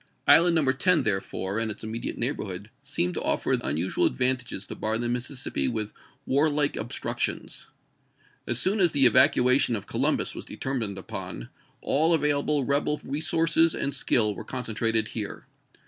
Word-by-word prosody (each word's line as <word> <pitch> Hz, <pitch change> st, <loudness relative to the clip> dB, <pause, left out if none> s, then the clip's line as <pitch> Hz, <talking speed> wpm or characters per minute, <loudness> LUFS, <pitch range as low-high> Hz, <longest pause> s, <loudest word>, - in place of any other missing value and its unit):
Island 170 Hz, +1 st, +6 dB
No. 160 Hz, -, +4 dB
10, 175 Hz, +6 st, +3 dB
therefore, 95 Hz, +1 st, -2 dB
and 115 Hz, -1 st, -1 dB
its 105 Hz, -, -7 dB
imme 110 Hz, +1 st, -5 dB
diate -, -, -4 dB
neighborhood, 105 Hz, -5 st, -4 dB
seemed 135 Hz, -11 st, -2 dB
to -, -, -3 dB
offer -, -, -1 dB
unusual 80 Hz, +6 st, 0 dB
ad -, -, -4 dB
vantages 125 Hz, -6 st, -1 dB
to -, -, -7 dB
bar 110 Hz, +1 st, -2 dB
the 120 Hz, +1 st, -2 dB
Mississippi 125 Hz, +2 st, -2 dB
with 110 Hz, -3 st, -3 dB, 0.3 s
warlike 145 Hz, +1 st, +2 dB
obstructions. 110 Hz, +2 st, -3 dB, 0.8 s
As 120 Hz, -, 0 dB
soon 190 Hz, -, +2 dB
as 175 Hz, -4 st, +5 dB
the 140 Hz, -2 st, +4 dB
evacuation 125 Hz, +2 st, +4 dB
of 100 Hz, -, -6 dB
Co -, -, -5 dB
lumbus -, -, +1 dB
was -, -, -7 dB
determined 115 Hz, -7 st, -4 dB
upon, -, -, -7 dB, 0.3 s
all 160 Hz, +4 st, +3 dB
available 145 Hz, -1 st, +1 dB
rebel 145 Hz, +2 st, +1 dB
resources 165 Hz, +2 st, +2 dB
and 140 Hz, -, -2 dB
skill 110 Hz, -5 st, +2 dB
were -, -, -8 dB
concentrated 115 Hz, -3 st, -1 dB
here. 105 Hz, -3 st, -6 dB
125 Hz, 160 wpm, -26 LUFS, 110-145 Hz, 0.8 s, Island